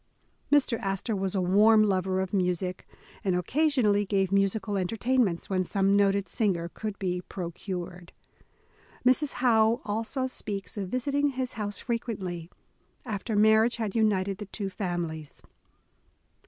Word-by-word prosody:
Mr. 270 -5 +3
Astor 195 +2 -2
was 195 0 -2
a 190 - +1
warm 215 +4 +5
lover 190 -2 +1
of 190 +1 -4
music, 180 -1 -1 0.4
and 190 -2 +1
occasion 270 - +1
ally 205 0 +3
gave 195 -1 0
musical 200 +1 +1
entertainments, 210 0 0
when 185 -1 0
some 195 +2 +1
noted 200 -1 +2
singer 175 -4 0
could 215 -2 -5
be 180 -2 -2
procured. 175 -1 -6 0.9
Mrs. 265 +3 +3
Howe 225 -1 +4
also 225 +5 -2
speaks 205 -6 -5
of 195 -3 -4
visiting 280 +5 0
his 260 -2 -3
house 205 -2 -4
frequently, 190 -8 -4 0.6
after 215 -1 -3
marriage 220 +3 +5
had 220 -4 -3
united 200 -3 +1
the 210 - -6
two 195 -1 -5
families. 175 -5 -4
200 Hz, 135 wpm, -28 LUFS, 185-225 Hz, 0.9 s, warm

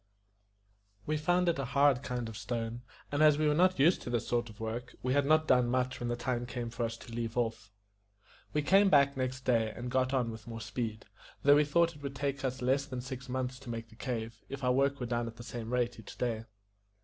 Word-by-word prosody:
We 155 - 0
found 175 +4 +2
it 170 -4 +2
a - - 0
hard 140 -3 +5
kind 125 -3 -3
of 110 - -7
stone; 115 0 -3 0.3
and, 145 +1 0
as 150 -2 +6
we 155 0 +2
were 150 - +4
not 185 +4 +4
used 160 +7 +4
to - - -6
this 120 -2 -1
sort 120 -1 0
of 105 +1 -14
work, 115 +2 -5
we 130 +1 +1
had 140 0 +2
not 155 +1 +4
done 125 -2 +4
much 130 +1 0
when 120 - -2
the 120 - 0
time 120 0 -2
came 120 -2 -4
for 120 +1 -3
us 115 0 -4
to 115 - -11
leave 115 0 -3
off. 115 -5 -1 0.8
We 150 - 0
came 195 +6 +5
back 140 -3 +5
next 130 0 -2
day, 115 -3 +2
and 125 0 -5
got 130 0 +2
on 125 -4 +1
with 110 0 -10
more 115 -1 -6
speed, 110 0 -4 0.4
though 145 +1 +7
we 150 0 +5
thought 170 +2 +2
it 145 - -14
would 140 -1 -4
not 135 - -11
take 140 -1 -1
us 130 -1 -2
less 135 +3 +2
than 130 -3 -4
six 130 0 -7
months 130 0 -2
to 130 -2 -10
make 115 -1 -5
the 110 - -16
cave, 115 -3 -4
if 140 0 -6
our 125 - +3
work 140 +1 +2
were 125 - -2
done 120 0 -1
at 115 - -7
the 120 - -10
same 115 -1 -6
rate 120 -1 0
each 110 - -11
day. 115 -2 -2
125 Hz, 250 wpm, -32 LUFS, 115-140 Hz, 0.8 s, though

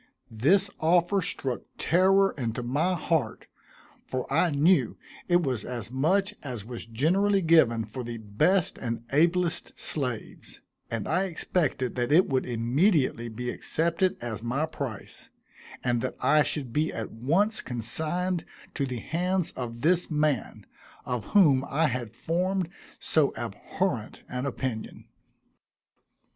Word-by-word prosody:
This 190 - +3
offer 175 +4 +3
struck 130 -7 -2 0.2
terror 195 +3 +4
into 120 -2 -3
my 150 +10 +1
heart, 160 -3 -1 0.6
for 130 -1 -2
I 165 +4 +4
knew 160 +5 +3 0.3
it 175 -1 +3
was 125 -7 -1
as 120 -3 -5
much 180 +10 +1
as 125 -7 -6
was 120 -1 -7
generally 185 - +2
given 120 -9 +4
for 130 - -6
the 120 0 -5
best 110 - +1
and 115 -1 -3
ablest 170 +3 +1
slaves, 125 -7 -4 0.3
and 115 -3 -3
I 185 +4 +1
expected 155 -7 -1
that 120 +2 0
it 175 +5 +6
would 130 -2 0
immediately 125 - +1
be 125 +2 -4
accepted 170 +3 0
as 115 -3 -4
my 130 +7 0
price, 135 -9 -6 0.5
and 120 -2 +1
that 130 - -3
I 150 - +4
should 135 -5 -2
be 155 +2 +1
at 115 - -5
once 170 - +1
consigned 160 - -2 0.3
to 140 - -1
the 125 -1 -4
hands 180 +1 -1
of 115 -2 -6
this 175 +3 +2
man, 150 -5 0 0.4
of 125 -4 -3
whom 150 -10 +5
I 155 +4 +2
had 120 -3 -4
formed 180 +5 -1 0.3
so - - +2
abhorrent - - -3
an 125 +2 -3
opinion. 130 -5 -4
145 Hz, 135 wpm, -27 LUFS, 120-175 Hz, 0.6 s, it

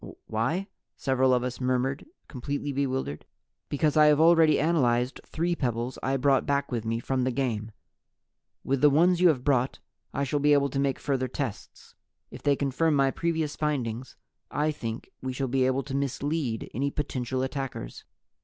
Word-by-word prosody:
"Why?" 160 - -1 0.3
several 130 -1 +2
of 125 -1 +2
us 125 +1 -4
murmured, 130 - 0 0.2
completely 145 +2 -4
bewildered. 130 - -2 0.5
"Because 150 +1 +1
I 155 -1 +7
have 150 -1 +5
already 160 -2 +5
analyzed 130 -6 +1
three 170 +2 -1
pebbles 120 -3 -2
I 135 +1 0
brought 135 0 +2
back 140 0 0
with 115 -2 -2
me 115 +1 -1
from 130 +2 -1
the 130 - +1
game. 120 -4 -2 0.9
With 135 0 0
the 150 - +7
ones 175 +5 +3
you 180 - +7
have 140 -7 +2
brought, 130 -2 +1 0.3
I 140 - -1
shall 145 +2 0
be 145 +1 +4
able 140 -1 +3
to 135 - -1
make 135 -1 +1
further 135 -2 -1
tests. 130 -3 -6 0.4
If - - -10
they 145 -1 +3
confirm 145 +3 +1
my 135 -1 +3
previous 160 -2 -1
findings, 130 -5 -2 0.3
I 150 +1 0
Think 115 -6 -6
We 130 0 -3
shall 135 +1 -2
be 130 0 +2
able 130 +1 0
to 135 0 -5
mislead 140 -2 -2
any 140 +4 0
potential 130 -3 -2
attackers. 130 - -5
135 Hz, 175 wpm, -27 LUFS, 125-145 Hz, 0.9 s, I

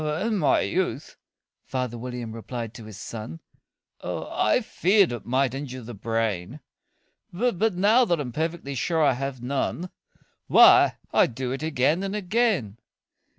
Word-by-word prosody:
"In 190 +8 -1
my 150 - +3
youth," 160 -6 -2 0.5
father 125 -2 -3
William 120 -1 -6
replied 115 0 -6
to 115 -2 -10
his 110 -2 -10
son, 110 +8 -7 0.6
"I - - 0
feared 195 - +2
it 120 -4 -6
might 130 0 +1
injure 130 -2 -6
the 120 +2 -8
brain; 110 +1 -2 0.7
But, 215 0 0
now 215 +7 +4
that 170 -6 0
I'm 130 -4 -4
perfectly 160 0 -3
sure 160 +5 0
I 140 - +4
have 130 -1 -5
none, 140 +7 -2 0.6
Why, - - +7 0.2
I - - +5
do 125 +1 -4
it 135 - -4
again 155 +2 +1
and 195 +1 -3
again." 195 - 0
135 Hz, 145 wpm, -25 LUFS, 120-175 Hz, 0.7 s, Why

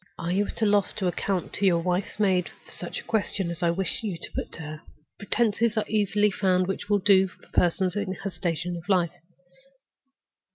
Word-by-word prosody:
"Are 170 - -3
you 200 +3 +1
at - - -4
a - - +5
loss 205 -2 +3
to 195 - -3
account 180 +1 -1
to 200 - 0
your 175 -2 +4
wife's 180 +4 -1
maid 185 -4 +2 0.2
for - - -16
such - - -6
a - - -10
question 200 -5 -1
as 170 - -6
I 170 - +3
wish 190 +3 0
you 205 -6 -3
to - - -8
put - - -4
to - - -7
her? 155 0 -7 0.4
Pretenses 225 +1 +1
are 215 - +2
easily 210 -1 +2
found 185 -1 +2
which 195 +2 -4
will 205 - +4
do 195 -1 +5
for 185 - -19
persons 180 +1 +2
in 205 -2 -1
her 195 +1 -5
station 175 0 -2
of 170 +3 -9
life. 175 -4 +3
190 Hz, 210 wpm, -26 LUFS, 175-205 Hz, 0.4 s, a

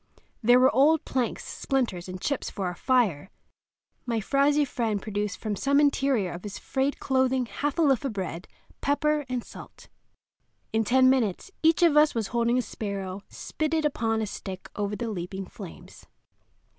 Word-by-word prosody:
There 245 +2 +6
were 260 +3 +5
old 300 +4 +4
planks, 255 -3 -2
splinters, 230 - -2
and 185 0 -6
chips 280 +8 -2
for 195 - -4
our 180 - -2
fire. 200 - +1 0.8
My 230 -2 0
frowsy 285 +6 +2
friend 230 -6 -1
produced 205 -1 -3
from 215 -2 -3
some 280 +6 +2
interior 275 -9 +2
of 175 - -7
his 205 0 -7
frayed 270 +1 -1
clothing 260 -1 +1
half 290 +4 -3
a 335 - +3
loaf 275 -4 +3
of 270 - -1
bread, 185 -3 -5 0.3
pepper, 300 +1 +1
and 250 -2 -2
salt. - - -13 0.8
In 225 0 +2
ten 255 +4 +4
minutes 255 - +1
each 325 +2 +4
of 330 -4 +5
us 300 -2 +5
was 225 -3 -1
holding 235 0 +1
a 250 - +1
sparrow 200 -3 -5
spitted 310 0 -2
upon 225 -6 0
a - - 0
stick 190 -2 -7
over 205 0 -2
the 235 +2 -4
leaping 190 0 -5
flames. 195 -4 -12
240 Hz, 170 wpm, -27 LUFS, 205-275 Hz, 0.8 s, There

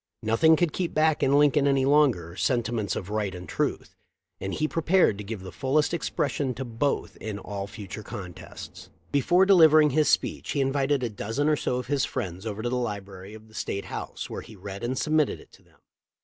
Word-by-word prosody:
Nothing 115 +9 +5
could 165 -1 0
keep 180 -3 -2
back 155 0 +3
in 140 +1 +4
Lincoln 145 -1 +4
any 135 -1 +3
longer, 135 - +3
sentiments 115 -3 0
of 95 +2 -5
right 105 -3 -1
and 90 -1 -9
truth, - - -2 0.4
and 95 - -4
he 155 +7 0
prepared 165 - +2
to - - -5
give 105 -1 -6
the 95 - -8
fullest 140 - +1
expression 145 -5 -1
to 135 - -5
both 120 +4 -2
in 110 -2 -5
all 100 0 -5
future 100 0 -8
contests. 95 -4 -9 0.2
Before 175 +7 +4
delivering 155 -6 +6
his 150 +2 +3
speech - - 0
he 145 - -1
invited 135 0 +1
a 120 - 0
dozen 115 +8 -2
or 155 - +4
so 125 - -1
of 125 - -3
his 140 -3 0
friends 95 -4 -4
over 110 0 -4
to 120 - 0
the 125 - -1
library 100 -3 -5
of 110 0 -14
the 110 - -20
State 100 -2 -4
House, - - -6
where - - -6
he 110 - -13
read 100 +1 -8
and 125 +2 -2
submitted 155 0 +1
it - - -17
to - - -19
them. - - -27
125 Hz, 205 wpm, -26 LUFS, 100-145 Hz, 0.4 s, delivering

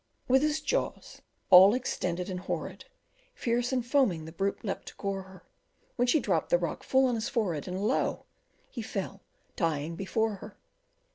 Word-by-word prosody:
With 265 +1 +5
his 305 +1 +1
jaws 480 +11 -2 0.3
all 190 +5 +9
extended 180 -8 -2
and 185 -2 -4
horrid, 185 - -5 0.5
Fierce 240 +1 0
and 250 -2 0
foaming, 240 - +2
the 160 - -8
brute 195 +6 -2
leapt 195 - -4
to - - -9
gore 195 -1 -3
her, 190 0 -14 0.5
When 245 0 +1
she 310 +5 +4
dropped - - 0
the - - +5
rock - - -3
full 265 0 +3
on 250 - +1
his 230 +3 -2
forehead, 200 - -1
And 185 +1 -3
lo! 245 - 0 0.5
he 240 - -5
fell 195 -2 -5 0.3
dying 160 -1 -1
before 210 +3 -1
her. - - -11
210 Hz, 170 wpm, -29 LUFS, 185-250 Hz, 0.5 s, all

